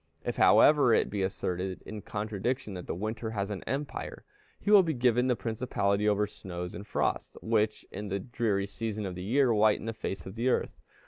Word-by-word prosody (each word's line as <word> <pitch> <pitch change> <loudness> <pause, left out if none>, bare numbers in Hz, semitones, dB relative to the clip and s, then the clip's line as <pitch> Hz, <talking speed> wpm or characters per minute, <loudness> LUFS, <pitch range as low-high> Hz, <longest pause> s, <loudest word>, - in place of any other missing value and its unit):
If, - - -2
however, 145 -6 +6
it - - +1
be 100 - -2
asserted, 95 -1 -2
in 110 -1 -7
contradiction, 110 +3 -3
that 90 -2 -7
the - - -3
winter 110 +4 -3
has 100 -2 -3
an 100 - -5
empire, 140 +1 -4 0.3
he 205 - -1
will 205 -2 +9
be 165 -4 -1
given 125 0 +3
the 125 - +2
principality 105 -2 0
over 105 0 +2
snows 90 -3 -7
and 105 - -8
frosts, - - -1
which, 110 -1 +1
in 105 +2 -5
the 100 0 -1
dreary 110 -3 -1
season 110 +1 -4
of 95 - -4
the 90 - -7
year, 120 +5 +3
whiten 105 0 +3
the 115 - -2
face 95 -5 -5
of 95 - -7
the 115 +4 0
earth. - - -1
105 Hz, 200 wpm, -29 LUFS, 100-120 Hz, 0.3 s, will